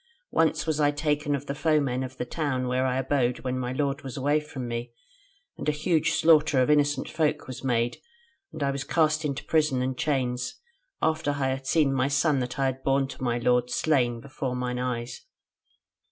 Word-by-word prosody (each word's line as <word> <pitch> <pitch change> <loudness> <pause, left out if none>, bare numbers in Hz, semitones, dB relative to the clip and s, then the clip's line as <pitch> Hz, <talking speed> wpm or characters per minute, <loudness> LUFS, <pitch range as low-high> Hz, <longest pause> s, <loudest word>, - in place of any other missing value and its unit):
Once 155 -1 +2
was 155 -2 0
I 145 -1 +4
taken 145 0 0
of 140 0 -5
the 140 - -3
foemen 140 -4 +1
in 130 - -3
the 125 - -3
town 130 -2 -2
where 130 +1 +1
I 130 0 0
abode 130 -2 0
when 130 0 -2
my 125 -1 -2
lord 140 +2 -1
was 135 -2 -7
away 145 +3 +2
from 145 -5 -7
me, 120 0 -4 0.7
and - - -1
a - - +4
huge 155 +1 +1
slaughter 155 -4 +4
of 130 +3 +3
innocent 145 -1 +2
folk 155 -1 0
was 130 0 -8
made, 120 -2 0 0.5
and 145 - -4
I 140 - +1
was 135 0 -3
cast 155 0 +2
into 145 -1 -2
prison 150 -5 +2
and 130 0 -2
chains, 125 -4 -1 0.5
after 160 -1 +1
I 135 -2 0
had 135 0 -3
seen 150 -4 +3
my 130 0 +1
son 145 0 +2
that 125 -1 -4
I 135 - +1
had 130 0 -1
borne 135 0 +2
to - - -10
my 120 -2 0
lord 125 0 +2
slain 125 -6 +1
before 135 -1 -4
mine 125 0 -2
eyes. 125 -1 -3
135 Hz, 200 wpm, -27 LUFS, 125-150 Hz, 0.7 s, I